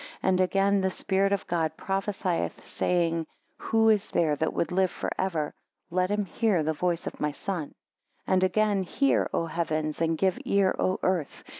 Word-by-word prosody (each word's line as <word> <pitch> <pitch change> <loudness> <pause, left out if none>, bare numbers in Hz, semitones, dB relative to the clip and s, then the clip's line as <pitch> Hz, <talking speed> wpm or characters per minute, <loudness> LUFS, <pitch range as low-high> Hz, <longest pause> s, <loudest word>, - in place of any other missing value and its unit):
And 185 -1 +3
again 195 +2 +2
the 190 - +1
Spirit 195 +1 0
of 200 - 0
God 160 -2 -1
prophesieth, 195 -2 -2
saying: 165 -2 0 0.3
Who 225 0 +2
is 215 -1 +2
there 155 -3 +2
that 160 - 0
would 170 - -1
live 185 +1 +2
for - - -4
ever, 165 -6 -1 0.4
let 185 +1 +1
him 205 0 0
hear 190 -2 +1
the 160 +1 0
voice 175 +1 -1
of - - -6
my 150 0 0
Son. 165 0 -4 0.5
4 - - 0
And 185 0 +3
again, 205 +1 +2
Hear, 275 +9 +1
O 165 - 0
Heavens, 155 -2 -2
and 165 -1 +1
give 190 0 +1
ear 200 -1 +2
O 185 - +1
Earth! 180 -6 -1
185 Hz, 180 wpm, -27 LUFS, 165-195 Hz, 0.5 s, And